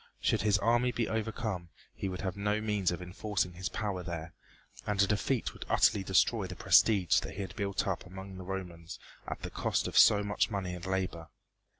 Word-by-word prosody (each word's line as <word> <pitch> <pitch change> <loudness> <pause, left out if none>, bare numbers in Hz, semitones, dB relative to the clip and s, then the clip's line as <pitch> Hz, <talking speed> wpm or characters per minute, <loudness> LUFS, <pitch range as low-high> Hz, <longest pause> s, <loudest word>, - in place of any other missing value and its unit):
Should - - +1
his 105 0 +3
army 120 +3 +2
be 120 -2 -1
overcome 110 -5 -3 0.2
he 95 - -4
would 90 0 -5
have 95 -3 -3
no 105 +1 0
means 105 -4 0
of 85 +1 -3
enforcing 95 +1 -2
his 90 0 -4
power 100 -4 -3
there, 85 -1 -6 0.5
and 105 -1 -1
a 100 - +6
defeat 105 +5 0
would - - -8
utterly 100 - +4
destroy 95 -1 +2
the - - -7
prestige 100 -6 +4
that - - -7
he 100 - -4
had 95 -2 -6
built 100 -2 -1
up 95 -3 -2
among 95 +1 -9
the 95 - -7
Romans 90 -3 -6 0.3
at - - -5
the - - -5
cost - - 0
of - - -6
so 105 -1 +7
much 100 +2 0
money 95 -4 -3
and 90 0 -7
labor. 90 -4 -2
95 Hz, 205 wpm, -31 LUFS, 90-105 Hz, 0.5 s, so